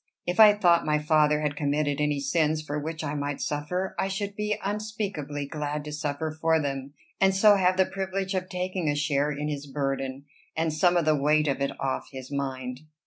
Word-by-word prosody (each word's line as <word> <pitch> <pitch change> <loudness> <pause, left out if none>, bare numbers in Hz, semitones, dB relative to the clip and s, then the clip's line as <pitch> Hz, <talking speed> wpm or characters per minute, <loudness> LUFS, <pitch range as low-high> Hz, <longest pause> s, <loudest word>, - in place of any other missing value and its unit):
If 180 +3 -2
I 215 -1 +10
thought 175 -5 +4
my 150 0 +2
father 150 0 +3
had 150 -1 -1
committed 145 0 0
any 150 -1 +1
sins 155 +1 +1
for 150 -1 -3
which 155 +2 -5
I 145 -1 -2
might 145 -1 -3
suffer, 180 +6 -2
I - - +1
should 200 +1 -3
be 210 0 -1
unspeakably 200 -9 -3
glad 150 +1 -4
to 150 - -7
suffer 150 +1 -3
for 160 +1 +1
them, 140 -1 -4 0.2
and 195 0 +4
so 205 +1 +6
have 185 -1 +2
the 190 - +5
privilege 190 0 -3
of 185 -1 -2
taking 180 -2 -2
a 145 - +1
share 145 0 +1
in 150 +1 -3
his 145 -1 -4
burden, 135 -1 -3 0.3
and 160 -1 0
some 175 +3 +3
of 170 - +1
the 155 0 +4
weight 150 +2 +2
of 140 -1 -1
it 140 - -2
off 135 -1 -2
his 130 0 -9
mind. 130 -2 -3
150 Hz, 205 wpm, -27 LUFS, 145-185 Hz, 0.3 s, I